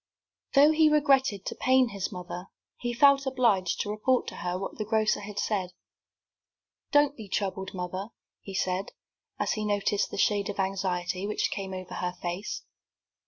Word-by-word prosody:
Though 290 +3 +7
he 315 0 +5
regretted 275 -9 +3
to - - -3
pain 260 -1 +3
his 200 -1 -4
mother, 180 0 -7 0.3
he 240 - -2
felt 275 +2 +5
obliged 230 -9 +2
to 205 - -3
report 245 +4 +1
to - - -10
her 180 0 -2
what 195 +3 -6
the - - 0
grocer 215 0 +1
had 205 0 -8
said. 190 -4 -1 1.2
"Don't 290 0 +4
be 220 -6 -10
troubled, 190 -1 -2
mother," 185 +2 -4 0.3
he 195 - -8
said, 185 +1 -1 0.5
as - - 0
he 215 - -1
noticed 205 -1 +1
the - - -6
shade 205 0 +2
of 205 - -5
anxiety 190 -1 -1
which 210 - 0
came 195 -2 -4
over 185 -1 -6
her 180 0 -3
face. 175 +4 -4
205 Hz, 165 wpm, -28 LUFS, 185-245 Hz, 1.2 s, Though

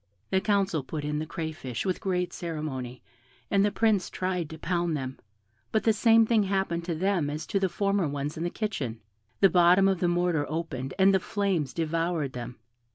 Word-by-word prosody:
The 190 0 +3
council 200 -6 +1
put 145 +2 -5
in 150 0 -1
the 155 - -4
crayfish 155 -6 -4
with 185 -2 -1
great 180 -2 -1
ceremony, 145 -7 -5 0.5
and 200 -1 +4
the 205 - +3
Prince 210 -2 +1
tried 180 -4 -2
to 160 - -8
pound 170 -1 -1
them; 130 -1 -5 0.5
but 220 - +1
the 225 - +4
same 225 +1 +5
thing 220 -1 +3
happened 190 -4 -1
to 170 -2 -2
them 180 -3 +1
as 150 +2 -4
to 200 - 0
the 190 -1 +1
former 200 -1 +1
ones 145 +1 -3
in 160 - -4
the 175 - 0
kitchen 150 - -3 0.4
the 195 - +7
bottom 180 +2 +6
of 190 -2 +1
the 175 - +2
mortar 175 -4 +1
opened 140 -5 -4
and 195 0 +5
the 190 - +4
flames 185 -8 -1
devoured 165 -3 -1
them. 125 0 -6
175 Hz, 195 wpm, -28 LUFS, 150-195 Hz, 0.5 s, the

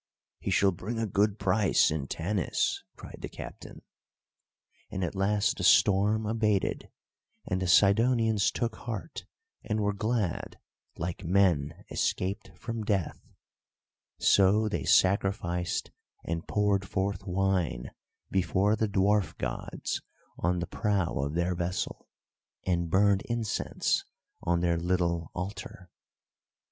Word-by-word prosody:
"He - - -4
shall 100 -1 +4
bring 105 +6 -5
a 115 - 0
good 105 +1 +1
price 100 -2 +3
in 75 -3 -2
Tanis," 90 +4 -1
cried - - -11
the - - -5
captain. - - -10 1.1
And 95 - -3
at 85 - -2
last 100 +1 +1
the - - -4
storm 105 +2 +4
abated, 105 -3 0 0.6
and 90 +1 -1
the 95 - -1
Sidonians 110 +3 +4
took 115 -2 -2
heart, 120 +6 -6 0.4
and 110 -1 -1
were 100 -1 +1
glad 105 -3 -2 0.4
like 85 +2 -4
men 85 -5 +1
escaped 95 +2 -1
from 115 -2 -4
death; 100 -6 -1 1.0
so 100 +3 +4
they 105 - -2
sacrificed 95 -2 +2 0.3
and 85 0 -3
poured 100 -2 +1
forth 95 0 -2
wine 90 -8 0 0.4
before 95 +2 +2
the 110 -1 0
dwarf 100 +1 +2
gods - - -4 0.3
on 90 +1 0
the - - -1
prow 100 -2 0
of 70 +3 -2
their 85 +1 +1
vessel, 90 +1 -3 0.6
and 85 -2 0
burned 100 +2 +4
incense 115 -3 -1 0.4
on 85 0 +1
their 85 -1 +2
little 85 -2 0
altar. 90 -1 -6
95 Hz, 120 wpm, -29 LUFS, 90-105 Hz, 1.1 s, shall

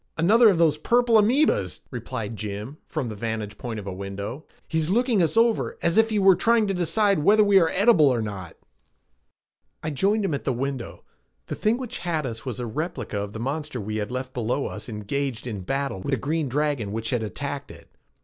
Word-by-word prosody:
"Another 215 +8 +6
of 190 - +2
those 160 -3 +3
purple 235 +3 +4
amoebas," 215 - +2
replied 115 -2 -5
Jim 105 +6 -6
from 155 -6 -3
the 110 - -6
vantage 110 -1 -4
point 115 -3 -4
of 100 - -9
a 95 - -4
window. 100 - -6 0.2
"He's 160 0 -1
looking 235 0 +2
us 170 +6 +1
over 230 -1 +2
as 170 +1 +2
if 225 +1 +4
he 215 - 0
were 195 -2 +6
trying 225 +4 +3
to 195 - -1
decide 195 +2 +2
whether 210 +8 +5
we 200 -1 +6
are 165 -3 +3
edible 190 -6 +5
or 125 -3 +2
not." 100 -6 -6 1.3
I 155 - -2
joined 200 +9 +1
him 165 - -1
at 140 - -3
the 135 - 0
window. 130 0 -4 0.4
The - - -5
thing 220 +3 +1
which 255 -3 -6
had 160 -4 -2
us 115 +1 -6
was 125 -3 -4
a 120 - -3
replica 125 - -4
of 100 0 -5
the 110 - -6
monster 140 +2 -3
we 110 +1 -4
had 105 -1 -3
left 130 +1 -5
below 125 +3 -1
us - - -6
engaged 115 +4 -3
in 105 -6 -4
battle 135 +1 -2
with 95 - -5
the 135 - +1
green 150 +3 -1
dragon 140 -6 -1
which 115 0 -3
had 120 -3 0
attacked 140 +6 -5
it. - - -13
140 Hz, 210 wpm, -25 LUFS, 110-190 Hz, 1.3 s, Another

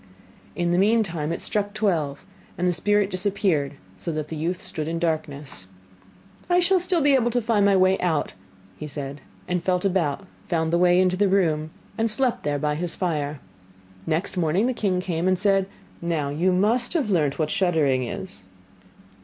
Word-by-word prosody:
In 175 -1 0
the 175 - +2
meantime 195 -7 +1
it 170 - -3
struck 205 0 -1
twelve, 165 -10 -1 0.3
and 180 0 0
the 180 - +2
spirit 205 +3 +2
disappeared, 185 -7 +1 0.2
so 100 - -3
that 155 -1 -4
the 160 - -5
youth 170 +4 -2
stood 180 -5 -4
in 165 +1 -2
darkness. 150 - -3 0.8
'I 355 0 +4
shall 370 +1 +3
still 355 -1 0
be 285 0 +4
able 245 -3 +3
to 245 +1 +1
find 215 -3 +2
my 200 - +4
way 185 0 +3
out,' 165 -4 0 0.5
said 140 -1 -5 0.3
he, - - -7
and 180 -1 +1
felt 180 0 0
about, 180 -3 0 0.2
found 160 -1 0
the 170 - +3
way 180 0 +4
into 185 0 +2
the 205 +1 +3
room, 160 -5 +1 0.3
and 225 0 +2
slept 245 +3 +2
there 145 -1 -1
by 150 +1 -1
his 165 +2 -2
fire. 150 -5 -2 0.7
Next 165 +5 -1
morning 175 +5 +2
the 255 - +1
king 190 -6 0
came 175 -1 -2
and 185 0 +3
said: 195 0 +2 0.3
'Now 165 -4 -1
you 165 +6 +1
must 210 +7 +1
have 290 - 0
learnt 150 -6 +1
what 155 -1 -1
shuddering 160 -9 +2
is? 185 - -7
180 Hz, 185 wpm, -24 LUFS, 155-200 Hz, 0.8 s, I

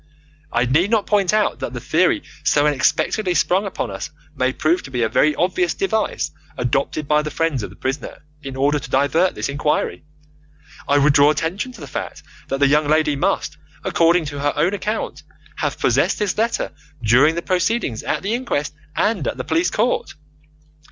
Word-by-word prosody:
I 120 +1 +2
need 155 +10 +2
not 220 -3 +2
point 200 -3 +2
out 215 -1 +1
that 120 - -4
the 120 - -4
theory 160 +9 +2 0.2
so 145 0 +3
unexpectedly 155 +6 +1
sprung 190 +4 +2
upon 125 - -4
us 95 0 -5 0.3
may 130 -1 +1
prove 155 +6 +1
to - - -10
be 125 -2 -1
a 110 - +1
very 150 +6 +3
obvious 175 -1 0
device 195 - -1 0.3
adopted 135 +4 -1
by 150 +1 +3
the 150 - -4
friends 160 -5 -1
of - - -5
the - - -14
prisoner 135 +3 -5 0.2
in 135 -2 -7
order 145 +2 +2
to 125 - -9
divert 145 +7 +2
this - - -2
inquiry. 145 +2 -1 0.8
I 145 - +3
would 145 +1 +4
draw 140 +1 +6
attention 170 - -1
to 230 - -13
the - - -6
fact 135 - -6 0.2
that 135 - -2
the 140 - +5
young 150 +1 +3
lady 155 -1 +2
must, 140 - -1 0.3
according 170 0 +3
to 145 -1 -5
her 145 +1 0
own 165 +6 +1
account, 210 +2 -3 0.4
have - - -2
possessed - - +2
this 205 -3 -1
letter 230 +2 -1 0.3
during 130 +9 +5
the 170 - -3
proceedings 185 - 0
at - - -2
the 205 +3 -1
inquest 235 - -2 0.2
and 200 - 0
at - - -2
the 130 - -3
police 165 +4 +1
court. 230 +4 -1
150 Hz, 190 wpm, -20 LUFS, 140-185 Hz, 0.8 s, draw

